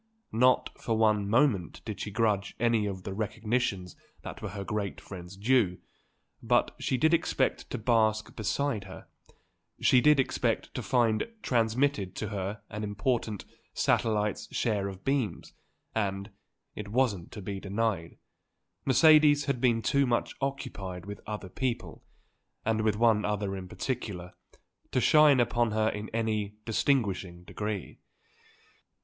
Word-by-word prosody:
Not 125 +3 +3
for 115 -1 0
one 105 -2 +2
moment 115 - +2
did 110 -3 -5
she - - -4
grudge 105 -2 0
any 115 -3 +2
of 95 -2 -5
the 95 - -5
recognitions 110 -2 -2 0.3
that - - -8
were - - -4
her 100 -1 -5
great 100 +1 -3
friend's 90 0 -10
due; 105 -4 +2 0.6
but 120 +1 +2
she 130 - 0
did 160 +6 +3
expect 165 - 0
to - - -3
bask 110 -2 +1
beside 110 +2 -1
her; - - -10 0.7
she 125 - +5
did 150 0 +5
expect 135 - 0
to - - -3
find 115 -4 +2 0.2
transmitted 115 -4 +1
to 110 - -3
her 100 0 -4
an 105 +1 -4
important 105 +1 -1 0.3
satellite's 105 -2 +1
share 105 -4 0
of 95 -1 -8
beams; 135 -5 -1 0.4
and, 100 -1 -2 0.4
it 105 - -7
wasn't 105 -6 0
to 105 - -7
be 100 0 -4
denied, 100 -4 -2 0.7
Mercedes 150 +1 +6
had 140 -4 -1
been 115 -3 +2
too 140 -1 +2
much 120 -1 0
occupied 100 -10 -4
with 100 0 -8
other 105 -2 -5
people 120 +5 -4 0.6
and 110 0 +1
with 110 -1 +2
one 110 -1 +3
other 105 -1 -1
in 95 -1 -6
particular 95 -6 -4 0.6
to - - +1
shine 150 +1 +6
upon 120 -1 +2
her 110 0 +2
in 105 0 -5
any 110 -2 -1
distinguishing 100 -8 0
degree. 105 +1 -5
110 Hz, 140 wpm, -29 LUFS, 100-120 Hz, 0.7 s, Mercedes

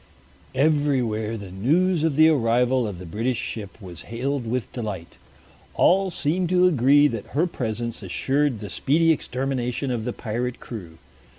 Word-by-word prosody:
Everywhere 130 -7 +1
the 100 -3 -9
news 160 - +1
of 160 -3 +1
the 155 +2 +7
arrival 125 -3 +2
of 100 -4 -6
the 90 - -9
British 115 +8 -2 0.2
warship 105 -1 -9
was 90 -5 -10
hailed 125 +2 -2
with 125 0 -3
delight. 105 -8 -6 0.6
All 190 +1 +4
seemed 170 +2 -1
to 180 0 +4
agree 145 -1 +5
that 115 -2 -6
her 165 - +4
presence 115 -8 -4
assured 130 +6 0
the 105 - -6
speedy 165 - +2
extermination 130 -2 -2
of 120 -3 -2
the 125 - -1
pirate 120 +3 -3
crew. 90 -9 -9
125 Hz, 155 wpm, -24 LUFS, 110-145 Hz, 0.6 s, the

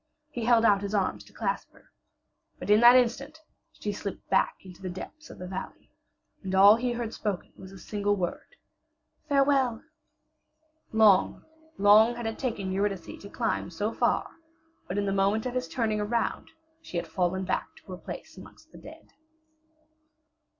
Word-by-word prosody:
He 240 -5 -4
held 230 -1 +4
out 200 -3 +4
his 200 +1 -3
arms 195 -2 -1
to - - -18
clasp - - -3
her. - - -23 0.7
But - - -3
in 210 - +7
that 240 +1 +8
instant 255 +5 +1 0.3
she 210 - -5
slipped 200 0 -7
back 190 - +2
into 185 -1 -14
the 185 - -4
depths 305 - -9
of - - -11
the 180 - -7
valley. 190 +1 -8 0.5
And 190 -1 -3
all 200 +2 +8
he 240 +1 -1
heard 235 -1 -4
spoken 205 -4 -4
was 190 0 -12
a 195 - -11
single 205 +2 -1
word, 185 - -5 0.7
"Farewell!" 275 -4 +2 1.1
Long, 215 -4 +4 0.3
long 215 +4 +6
had 240 -1 -6
it 225 0 -4
taken 215 -7 -3
Eurydice 195 -3 -3
to 200 - -10
climb - - -2
so 205 +6 -3
far, - - +1 0.6
but 185 - -4
in 205 - 0
the 195 - 0
moment 200 +3 +1
of 250 - -3
his 255 0 -2
turning 220 -3 -1
around 230 +3 -2 0.3
she 180 - -6
had 170 - -2
fallen 185 +2 -1
back 185 - -1
to - - -15
her 180 - -6
place - - -9
amongst - - -15
the - - -13
dead. - - -14
205 Hz, 170 wpm, -28 LUFS, 190-235 Hz, 1.1 s, that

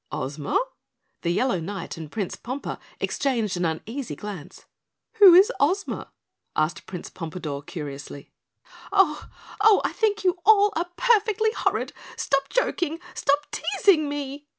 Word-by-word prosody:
"Ozma?" 140 +2 -1 0.6
The 170 - -1
Yellow 190 +2 +1
Knight 185 +2 -5
and 160 -2 -9
Prince 200 -5 -3
Pompa 260 +4 -5 0.2
exchanged 235 -8 -1
an 175 0 -1
uneasy 225 - -4
glance. 200 -8 -9 0.5
"Who 385 -4 +10
is 395 +6 +7
Ozma?" 365 +8 0 0.4
asked 155 +2 -1
Prince 180 -2 -7
Pompadore 160 -4 -5
curiously. 145 -2 -8 0.6
"Oh! 385 -7 +2 0.3
Oh, 425 -2 +7
I - - 0
think 425 -2 0
you 365 -1 +2
all 415 -1 +5
are 340 +2 -1
perfectly 440 -2 +3
horrid. - - -1 0.2
Stop 275 0 0
joking! 350 -9 0 0.2
Stop 290 +1 +1
teasing 390 -7 +2
me!" 285 0 -5
280 Hz, 130 wpm, -25 LUFS, -, 0.6 s, Who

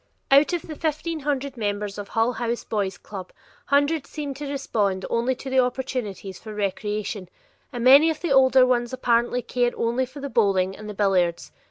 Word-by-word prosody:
Out 280 +4 +6
of 350 -2 -2
the 310 - -8
fifteen 315 +1 -2
hundred 280 -2 -2
members 205 -1 -3
of 205 - -6
the - - -19
Hull 225 +2 +2
House 235 0 -2
Boy's 200 -3 -2
club, 190 -3 -9 0.4
hundreds 285 +2 +1
seem 290 -2 -5
to 280 +1 -6
respond 210 -9 -1
only 240 +3 +1
to 270 - -10
the 265 0 +2
opportunities 250 -7 -2
for 215 -1 -9
recreation, 205 -1 -3 0.4
and 240 -3 -4
many 280 +6 +8
of 315 - -2
the 345 - -2
older 265 -1 +6
ones 240 -1 0
apparently 240 -1 +1
care 245 -1 0
only 240 +3 0
for 265 +3 -11
the 280 - -4
bowling 195 -6 +1
and 215 0 -9
the 210 - -7
billiards. 185 -4 +1
245 Hz, 190 wpm, -24 LUFS, 210-275 Hz, 0.4 s, many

